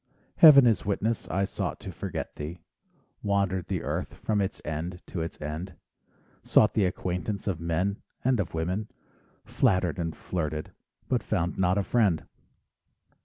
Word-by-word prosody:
Heaven 140 -5 +10
is 115 -3 +3
witness 105 +3 -1
I 95 +1 +1
sought - - -3
to - - -6
forget - - -5
thee, 75 +4 -6 0.6
Wandered 100 -3 0
the 95 -4 -2
earth - - -3
from 105 -2 0
its 95 - -2
end 80 +4 -4
to 85 - -4
its 80 - -5
end, 80 +5 -5 0.7
Sought 105 - +4
the 105 - +3
acquaintance 90 +2 -2
of 95 -6 -1
men 85 +5 -1 0.2
and 130 -3 +3
of 90 -4 -2
women, 90 +6 -1 0.6
Flattered 95 - +1
and 80 -2 -2
flirted, 80 -3 -3 0.4
but 125 -3 +1
found 90 -4 -1
not 90 +1 +3
a 100 - +2
friend. 100 -8 +2
95 Hz, 150 wpm, -28 LUFS, 85-105 Hz, 0.7 s, Heaven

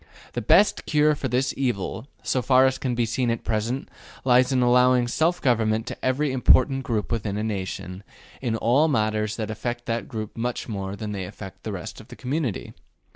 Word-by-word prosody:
The - - -2
best 205 - +4
cure 150 0 +4
for 140 -2 -3
this 130 +1 0
evil, 120 -2 -2 0.2
so 130 - 0
far 130 +1 +5
as 130 0 +1
can 125 -3 -1
be 120 -1 +1
seen 120 +2 -1
at 115 0 -2
present, 115 +4 -2 0.4
lies 125 0 +4
in 130 -2 +3
allowing 125 0 +4
self 165 +8 +1
government 110 -4 +1
to - - -8
every 135 +3 +1
important 130 +1 +4
group 115 -5 -2
within 105 -3 -2
a 105 - -2
nation 95 -3 -4 0.4
in 120 -4 -1
all 125 +7 +3
matters 110 -5 0
that 110 -1 -4
affect 120 +2 -4
that 115 0 -2
group 110 -2 -6
much 120 +1 -3
more 100 -3 -4
than 105 +1 -5
they 95 -2 -4
affect 95 +1 -10
the 110 - -5
rest 95 +1 -7
of 110 - -16
the 125 - -11
community. 130 -3 -3
120 Hz, 195 wpm, -24 LUFS, 110-130 Hz, 0.4 s, far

